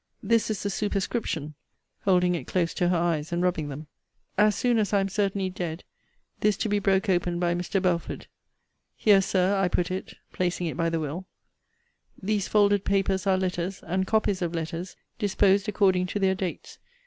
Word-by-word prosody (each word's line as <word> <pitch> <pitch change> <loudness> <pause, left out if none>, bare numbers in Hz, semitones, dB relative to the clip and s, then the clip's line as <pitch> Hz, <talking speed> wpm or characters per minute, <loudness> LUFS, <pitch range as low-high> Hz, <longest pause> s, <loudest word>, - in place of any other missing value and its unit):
This 225 +2 +2
is 215 -3 -2
the 200 - -1
superscription 195 -7 -2 0.5
[holding 180 -2 +3
it 160 -7 -4
close 175 -2 0
to 175 - +1
her 180 - +2
eyes, 165 -2 0
and 175 +1 0
rubbing 160 -5 0
them]; 145 +3 -7 0.5
As 210 +1 +4
soon 240 -2 +2
as 210 -1 0
I 200 - +5
am 195 0 0
certainly 195 -1 -1
dead, 175 -2 -5 0.6
this 210 -1 +2
to 225 - -1
be 205 0 +2
broke 195 +1 +2
open 175 -2 +1
by 175 -1 +1
Mr. 180 +3 -1
Belford. 180 -3 -1 0.7
Here, 205 -3 +5
Sir, 190 +1 +1
I 195 -1 +2
put 175 0 0
it 185 - -5 0.2
[placing 180 -1 -1
it 160 - -3
by 165 0 0
the 165 0 -1
will]. 160 +5 -5 0.9
These 200 0 -1
folded 205 -2 +3
papers 195 -1 0
are 190 -1 +4
letters, 185 0 -3
and 190 +3 -1
copies 205 -3 +1
of 170 -1 -2
letters, 165 +2 -4 0.2
disposed 200 -1 +2
according 190 -3 +2
to 205 - -3
their 190 -1 +3
dates. 185 -2 -5
185 Hz, 185 wpm, -26 LUFS, 175-200 Hz, 0.9 s, I